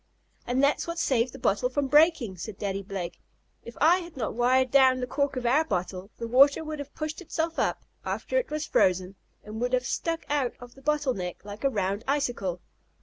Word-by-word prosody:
"And 250 +3 +1
that's 280 +4 +2
what 335 0 -4
saved 255 -6 +1
the 270 - -10
bottle 245 0 +1
from 280 +2 0
breaking," 295 - +4
said 190 +4 -7
Daddy 195 -1 -2
Blake, 190 -3 -6 0.4
"If 235 - -11
I 335 +5 +5
had 340 -4 -10
not 225 - -2
wired 255 +2 +2
down 260 -2 +5
the 250 - -1
cork 280 +2 -1
of 250 -1 -3
our 270 +7 +4
bottle 185 - -3
the 230 - -4
water 275 +6 +5
would 310 -1 -5
have 285 0 -8
pushed 310 +2 -4
itself 330 -1 -2
up, - - 0 0.2
after - - -1
it - - -4
was 305 0 -2
frozen, 185 -4 +2 0.3
and 215 +2 -7
would 245 +1 -1
have 250 0 +2
stuck 330 +4 -2
out 285 -4 0
of 245 0 -12
the 270 - -17
bottle 295 -2 +1
neck, 180 -2 -6
like 205 +3 -9
a 275 - +4
round 200 -2 -1
icicle." 240 -11 -1
255 Hz, 210 wpm, -27 LUFS, 210-295 Hz, 0.4 s, I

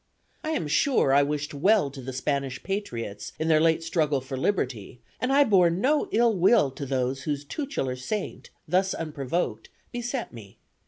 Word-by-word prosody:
I 310 - -3
am 160 - -1
sure 155 - +3
I 140 - +6
wished 145 +1 -2
well 175 0 +3
to 135 -1 -9
the 130 +1 -6
Spanish 135 0 -2
patriots, 120 - -4
in 160 +1 -1
their 155 -1 +5
late 165 0 +3
struggle 155 -4 +1
for 130 +1 -6
liberty, 130 - -2 0.2
and 255 - 0
I 285 +1 +6
bore 190 -8 +4
no 260 - +1
ill 230 +1 +3
will 185 - +4
to 140 +1 -6
those 130 0 -1
whose 145 +1 -3
tutelar 205 - -3
saint, 185 +11 -5 0.2
thus 185 +4 +1
unprovoked, 145 -6 -3 0.2
beset 240 - -4
me. 105 -4 -12
150 Hz, 170 wpm, -26 LUFS, 135-195 Hz, 0.2 s, I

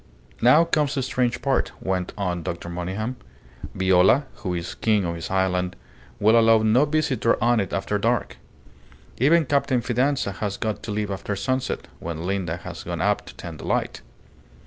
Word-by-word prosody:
"Now 140 +8 +6
comes 150 -3 0
the 135 - 0
strange 125 -1 -1
part," 135 -1 0
went 95 -1 -2
on 90 -3 -2
Dr. 85 +1 -5
Monygham. 95 +8 -4 0.6
"Viola, 95 +8 +4
who 90 -4 -3
is 85 0 -4
king 105 -4 +1
on 85 - -2
his 85 -1 -6
island, 90 -1 0 0.4
will 110 +3 +5
allow 115 -1 +5
no 115 +6 +4
visitor 145 -6 +1
on 120 0 +3
it 100 - -2
after 100 +2 -1
dark. 115 +3 0 0.8
Even 155 +6 +4
Captain 140 -2 +1
Fidanza 125 -1 0
has 100 +1 -4
got 110 -2 -3
to 110 - -6
leave 105 -1 -2
after 100 +1 -3
sunset, 130 +5 -2
when 80 -1 -5
Linda 90 -3 -2
has 85 - -8
gone - - -4
up - - 0
to - - -11
tend 80 -2 -8
the - - -8
light. - - -1
105 Hz, 170 wpm, -24 LUFS, 95-130 Hz, 0.8 s, Now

